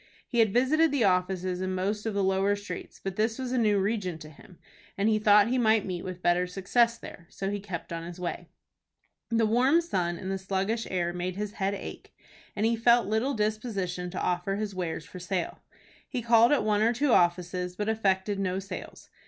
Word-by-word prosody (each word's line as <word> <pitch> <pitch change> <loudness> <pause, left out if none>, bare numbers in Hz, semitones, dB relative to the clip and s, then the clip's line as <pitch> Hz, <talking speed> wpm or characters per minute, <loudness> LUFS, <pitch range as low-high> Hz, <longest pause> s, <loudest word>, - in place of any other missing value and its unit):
He 240 - -1
had 220 -3 +4
visited 295 +8 +3
the 280 -5 +1
offices 185 -1 +1
in 185 0 -2
most 205 +4 -2
of 215 - -2
the 200 - +1
lower 195 +1 +2
streets, 200 -3 -8
but 195 -1 -4
this 220 +1 +1
was 260 -2 -4
a 255 - 0
new 210 -3 +3
region 195 -4 -1
to 155 -1 -11
him, 175 +4 -17 0.4
and 200 +2 +1
he 215 -1 +3
thought 210 0 +5
he 255 +1 +1
might 220 -3 +3
meet 180 -2 -4
with 185 -1 -7
better 175 +1 +2
success 230 +6 +1
there. 170 -6 -11
So 195 0 -4
he 205 - -2
kept 185 -4 -6
on 165 - -4
his 175 +1 -8
way. 175 -1 -5 0.8
The 230 -1 +2
warm 255 +8 +4
sun 180 - -1
and 190 +2 -5
the 195 - -2
sluggish 195 +4 -2
air 175 -2 -1
made 180 +1 -3
his 210 +1 -3
head 200 -2 -1
ache, 195 - -9 0.4
and 210 - 0
he 230 +1 +3
felt 235 +1 +4
little 220 +7 0
disposition 210 -5 -2
to 180 - -5
offer 180 +2 -1
his 210 -1 -3
wares 180 -3 -4
for 180 - -10
sale. 180 0 -3 0.5
He 250 -3 -3
called 235 +1 +5
at 290 - +3
one 210 -1 +2
or 230 +2 +3
two 280 +3 +1
offices, 180 0 +1
but 210 +2 -3
effected 200 -2 0
no 185 -1 -1
sales. 195 +1 -8
200 Hz, 210 wpm, -28 LUFS, 180-225 Hz, 0.8 s, thought